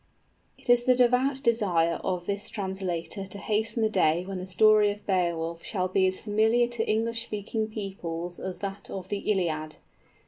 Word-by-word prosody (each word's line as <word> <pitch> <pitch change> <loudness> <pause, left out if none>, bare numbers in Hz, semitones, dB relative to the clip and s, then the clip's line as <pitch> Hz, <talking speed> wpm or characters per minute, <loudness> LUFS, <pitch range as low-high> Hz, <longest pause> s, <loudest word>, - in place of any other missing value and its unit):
_ - - -19
It - - -12
is 245 0 +5
the 255 -1 +5
devout 255 +2 +2
desire 180 -8 +2
of 180 -2 -2
this 200 +1 -3
translator 190 -1 -4
to 195 - -7
hasten 220 +2 0
the 220 - +3
day 175 -3 +2
when 190 -1 -5
the 185 - -6
story 210 +3 +5
of 205 0 -6
Beowulf 170 -3 -1
shall 185 -4 -1
be 190 0 +2
as 185 0 -2
familiar 220 +3 +2
to 240 -2 -2
English 230 +1 0
speaking 215 0 -3
peoples 180 -5 -5
as 185 -1 -4
that 195 0 -6
of 190 -1 -6
the 205 - -2
Iliad. 155 -5 -1
200 Hz, 180 wpm, -27 LUFS, 180-220 Hz, -, is